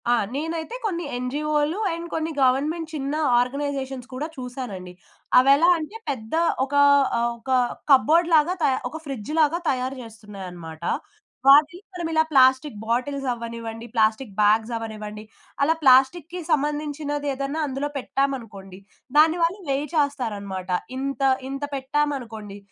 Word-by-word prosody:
ఆ! - - +5 0.2
నేనైతే 325 - -3
కొన్ని 345 -5 -2
ఎన్‌జీఓలు, 295 +6 -1
అండ్ 335 +1 -6
కొన్ని 320 0 -2
గవర్నమెంట్ 305 +6 +1
చిన్న 280 -1 -3 0.2
ఆర్గనైజేషన్స్ 270 0 -3
కూడా 280 +5 -3
చూసానండి. 245 -8 -7 0.5
అవెలాంటే, 315 - +3
పెద్ద 225 -4 -5 0.3
ఒక 275 - -11 0.4
ఆహ్, 235 0 +1
ఒక 230 - -12 0.4
కబోర్డ్ 310 +5 +5
లాగా 310 +3 +4
త - - 0 0.3
ఒక 320 +5 -7
ఫ్రిడ్జ్ 270 -3 -6
లాగా 315 +2 +3
తయారు 260 0 -1
చేస్తున్నాయనమాట. 190 -7 -10 0.7
వాటిని 300 +5 +6
మనం 345 -2 -4
ఇలా 315 0 +4
ప్లాస్టిక్ 260 -1 +4
బాటిల్స్ 265 +4 -1
అవ్వనివ్వండి, 230 -1 -7
ప్లాస్టిక్ 220 0 +1
బ్యాగ్స్ 220 +3 +3
అవ్వనివ్వండి, 215 -1 -7 0.4
అలా 295 +3 +4
ప్లాస్టిక్‌కి 280 +6 +4
సంబంధించినది 290 0 -1
ఏదన్నా 275 +3 -3
అందులో 275 +1 -3
పెట్టామనుకోండి, 230 -9 -3 0.4
దాని 320 +3 +6
వాళ్ళు 345 +5 0
వేయ్ 275 +2 0
చేస్తారన్నమాట. 210 -11 -2 0.3
ఇంత 275 -1 -3 0.3
ఇంత 275 +1 -5
పెట్టామనుకోండి 260 -7 -3
275 Hz, 120 wpm, -24 LUFS, 230-300 Hz, 0.7 s, వాటిని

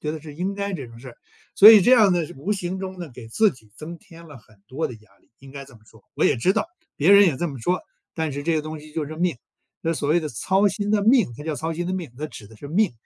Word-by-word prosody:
觉 150 - -3
得 155 -1 -6
是 150 -2 -11
应 185 +5 -3
该 200 0 -4
这 135 -7 -6
种 115 0 -14
事。 125 -1 -11 0.4
所 210 +3 +10
以 215 -3 +8
这 245 +7 +4
样 215 -6 +6
呢， 170 -3 0
是 - - -12
无 160 +10 -5
形 185 -1 -4
中 190 -1 -7
呢， 170 -3 -7
给 115 -3 -11
自 215 - +3
己 110 -4 -20
增 170 +2 -8
添 165 0 -16
了 145 -5 -13
很 110 -1 -23
多 135 +8 -3
的 125 - -8
压 105 -3 -21
力， - - -35
应 135 0 -15
该 140 -1 -8
这 135 - -18
么 110 - -18
说。 - - -21
我 - - 0
也 - - +3
知 180 +11 +2
道， - - -1 0.3
别 170 +8 +4
人 200 0 +8
也 150 - +1
这 175 - -2
么 135 -6 -7
说， 180 +8 0 0.3
但 160 -3 -2
是 145 +1 -5
这 165 +1 0
个 - - 0
东 155 0 -7
西 155 0 -15
就 155 -3 -3
是 155 - -8
命。 170 -2 -1 0.5
那 165 0 -1
所 145 - -3
谓 170 +2 +3
的 155 - -4
操 190 - +1
心 205 +1 -3
的 210 -1 +2
命， 230 - +3
它 145 - -9
叫 155 -1 -3
操 160 +3 -4
心 175 +2 -4
的 185 - -3
命， 170 -10 -6
它 155 - -4
指 110 -8 -12
的 110 - -16
是 145 - -10
命。 195 - +1
160 Hz, 330 characters per minute, -23 LUFS, 140-185 Hz, 0.5 s, 所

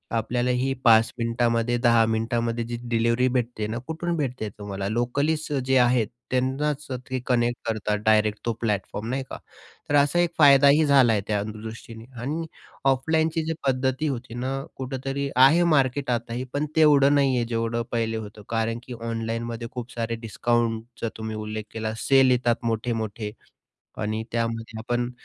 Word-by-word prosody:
आपल्याला 120 +2 0
ही 130 +2 0
5 115 0 +6
मिनिटामध्ये, 115 0 +1
10 115 -2 +4
मिनिटामध्ये 115 +1 -1
जी 120 0 -4
डिलिव्हरी 115 +2 +2
भेटते 115 -3 -1
ना, 110 +2 -3
कुठून 170 +2 -2
भेटते? 125 -7 -2
तुम्हाला 100 -1 -5
लोकलीच 140 +8 0 0.2
जे 130 0 +3
आहेत 120 -3 +3 0.2
त्यांनाच 135 +3 -1 0.2
ते 130 0 -1
कनेक्ट 120 -1 +1
करतात 105 -1 -1
डायरेक्ट 110 -1 +3
तो 115 - +1
प्लॅटफॉर्म, 105 -1 -2
नाही 130 +2 -1
का? - - -6 0.5
तर 145 - +2
असा 145 +4 +3
एक 175 - +3
फायदाही 140 +1 +6
झाला 135 -5 +5
आहे 105 - +1
त्यादृष्टीने 110 +2 -5 0.2
आणि 155 +6 -3 0.5
ऑफलाईनची 160 +4 +1
जी 165 - -1
पद्धती 130 +3 0
होती 125 -4 -4
ना, 125 +2 -3 0.2
कुठेतरी 135 +1 -3
आहे 135 +7 +6
मार्केट 135 0 +1
आताही. 120 +1 -2
पण 145 +1 0
तेवढं 145 -3 +5
नाही 135 -2 +3
आहे 120 -1 +1
जेवढं 115 0 -1
पहिले 115 -1 -1
होतं. 105 -1 -8
कारण 115 0 -1
की 125 - -8
ऑनलाईनमध्ये 115 0 -3
खूप 125 0 -7
सारे 115 0 -2
डिस्काउंटचा 115 0 -1
तुम्ही 110 0 -5
उल्लेख 110 0 -4
केला, 110 -1 -3
सेल 135 +1 +4
येतात 120 -1 +2
मोठे-मोठे 110 -2 -2 0.7
आणि 110 +1 -2
त्यामध्ये 115 -1 -3
पण 120 0 0
120 Hz, 150 wpm, -25 LUFS, 115-135 Hz, 0.7 s, 5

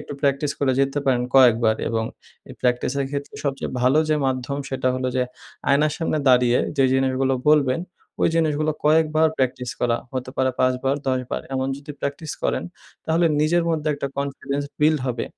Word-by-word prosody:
একটু - - -8
প্র্যাকটিস 140 0 +1
করে 135 -2 +2
যেতে 135 +1 +1
পারেন 125 -2 +2
কয়েকবার। 115 -4 +5
এবং 115 -1 -1 0.4
এই - - -9
প্র্যাকটিসের 125 +2 0
ক্ষেত্রে 140 0 -5
সবচেয়ে 135 -1 -2
ভালো 130 +4 +4
যে 155 - +3
মাধ্যম 130 +1 -2
সেটা 130 -1 -1
হলো 130 0 -1
যে 130 - +2 0.5
আয়নার 150 +2 +3
সামনে 165 -2 -1
দাঁড়িয়ে 125 -1 +4 0.2
যেই 135 -2 +4
জিনিসগুলো 130 0 +1
বলবেন 145 -2 +4 0.4
ওই - - +4
জিনিসগুলো 155 -2 +1
কয়েকবার 155 +1 +4
প্র্যাকটিস 125 -1 -1
করা। 120 -1 +2 0.2
হতে 130 0 -4
পারে 130 0 +2
৫ 130 0 +3
বার, 135 +1 +1
১০ 130 -1 +1
বার। - - -2
এমন 130 0 0
যদি 145 +2 -10
প্র্যাকটিস 145 +2 -4
করেন - - 0 0.4
তাহলে 165 +2 +2
নিজের 165 +3 +3
মধ্যে 155 -1 -1
একটা 140 -1 -3
কনফিডেন্স 140 0 -3 0.2
বিল্ড 155 +1 +4
হবে। 125 -1 -2
135 Hz, 175 wpm, -22 LUFS, 130-150 Hz, 0.5 s, কয়েকবার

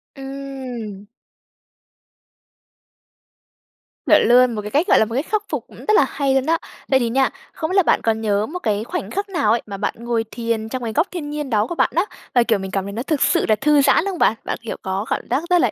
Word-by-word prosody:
Ừm. 265 -7 -7 3.0
Chuẩn - - +6
luôn, 245 0 +5
một 210 - -3
cái 210 0 -7
cách 300 +8 +2
gọi - - +5
là - - +4
một 230 +2 -6
khắc 430 -1 0
phục - - -3
cũng - - -16
rất 430 - 0
là - - +5
hay 275 -2 0
luôn 265 -1 +2
đó. 330 +2 +2 0.3
Vậy 265 - +3
thì 235 -2 0
nha, 265 +3 +2 0.2
không 315 - -3
biết - - -1
là 385 - +6
bạn - - +2
còn 220 -1 +1
nhớ 210 -1 +1
một 350 +9 -6
cái 215 - -1
khoảnh 355 +10 -4
khắc 400 +2 -3
nào 335 - +1
ấy 230 - +2
mà 200 -2 -6
bạn 205 - -1
ngồi 235 -1 -1
thiền 230 -2 -2
trong 255 +1 -4
cái 225 -2 -3
góc 315 - +2
thiên 325 -5 -5
nhiên 295 -2 -4
đó 215 -2 +1
của 345 - -4
bạn - - +2
á? 345 +4 +3 0.3
Và 245 - +5
kiểu 225 -3 +1
mình 190 0 -6
cảm 195 0 -1
nhận 200 0 -6
nó 235 - -3
thực 295 0 -1
sự - - +3
là 215 - +5
thư 295 +4 +3
giãn 275 - +4
không 385 -4 -3
bạn? 220 - +4
Bạn, - - -2
kiểu, 230 - -5
có 190 +2 -3
cảm - - 0
giác 290 - 0
rất 355 -1 +4
là - - +2
245 Hz, 250 wpm, -21 LUFS, 220-300 Hz, 3.0 s, Chuẩn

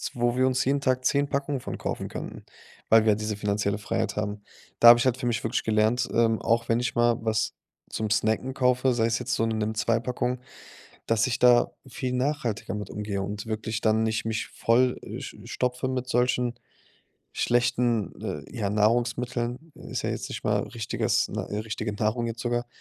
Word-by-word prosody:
wo 120 0 +1
wir 130 0 +3
uns 130 0 +1
jeden 140 +1 +1
Tag 130 -2 0
10 140 +2 +2
Packungen 140 -1 -1
von - - -6
kaufen - - -3
könnten, - - -7 0.5
weil 110 0 +6
wir 110 - +5
diese 105 0 -3
finanzielle 100 0 0
Freiheit 105 0 -2
haben. 105 0 -3 0.4
Da 120 - +8
habe 120 - +10
ich - - +1
halt 130 -1 +2
für 130 -2 -3
mich 115 -1 -1
wirklich 110 - -1
gelernt, 110 +3 +2
ähm, 115 -1 +2
auch 115 +1 +1
wenn 115 0 +3
ich 120 -1 -2
mal 120 -1 +3
was 110 -1 0 0.4
zum 110 -1 -3
snacken 110 +5 0
kaufe, 125 0 +2
sei 115 - +2
es 115 0 +1
jetzt 125 0 -1
so - - 0
'ne 115 - -1
Nimm2-Packung, 115 +3 -1 0.7
dass 115 -1 +2
ich 130 - -1
da 120 -1 +5 0.2
viel 130 0 -4
nachhaltiger 125 -6 -1
mit 105 -2 -5
umgehe 105 -2 -3
und 100 +1 -5
wirklich 110 0 -3
dann 110 0 +3
nicht 110 -1 0
mich 110 0 -2
voll 125 +2 +2
äh, - - -7
sch - - -8
stopfe 125 +1 -2
mit 125 -1 -3
solchen 125 0 +1 0.8
schlechten, 120 -2 +1
äh, - - -4
ja, 100 -3 -1
Nahrungsmitteln 120 +5 0
ist - - -5
ja - - -1
jetzt - - -4
nicht - - -5
mal - - +2
richtiges 115 -2 0
ne, - - -4 0.2
richtige 110 -1 -3
Nahrung 110 +3 0
jetzt 115 0 -5
sogar. 120 0 -1
115 Hz, 190 wpm, -26 LUFS, 110-125 Hz, 0.8 s, habe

